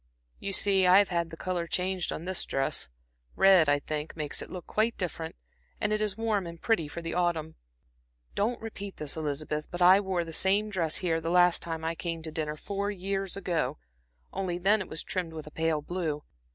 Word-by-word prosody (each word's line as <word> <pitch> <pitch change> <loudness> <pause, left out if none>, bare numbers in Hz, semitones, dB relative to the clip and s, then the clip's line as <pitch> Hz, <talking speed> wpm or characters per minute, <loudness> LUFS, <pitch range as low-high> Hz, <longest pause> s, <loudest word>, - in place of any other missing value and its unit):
"You 200 - -3
see 195 -1 +4
I 180 +1 +8
have 200 0 +5
had 170 -2 0
the 165 - -9
color 175 -1 -2
changed 185 0 -1
on 165 - -5
this 185 0 0
dress 135 - -1 0.5
red, 190 -6 +6
I 145 - +5
think, 150 +1 -4
makes 150 -2 -2
it - - -7
look 180 -3 -7
quite 225 +2 0
different, 165 -3 -4 0.4
and 210 0 +1
it 215 - 0
is 210 -1 -1
warm 215 -5 0
and 170 0 -8
pretty 220 -8 +1
for 170 +3 -7
the 165 - -3
autumn. 170 -3 0 0.8
Don't 230 +4 0
repeat 200 -3 -7
this, 150 -2 -2
Elizabeth, 150 0 -3
but 175 - -6
I 185 +2 +8
wore 190 -4 -1
the 165 - -8
same 200 +5 +2
dress 165 -5 0
here 165 -3 +1
the 165 - -2
last 175 0 +4
time 165 -1 -4
I 165 - 0
came 165 -1 -4
to 160 - -4
dinner 155 -1 -3
four 200 +4 -3
years 195 -1 -2
ago 180 -4 -1 0.6
only 185 -2 -2
then 205 +4 +3
it 190 - -5
was 155 - -3
trimmed 175 -4 -3
with 155 -1 -7
pale 160 -2 0
blue. 160 -4 -2
175 Hz, 205 wpm, -29 LUFS, 160-195 Hz, 0.8 s, I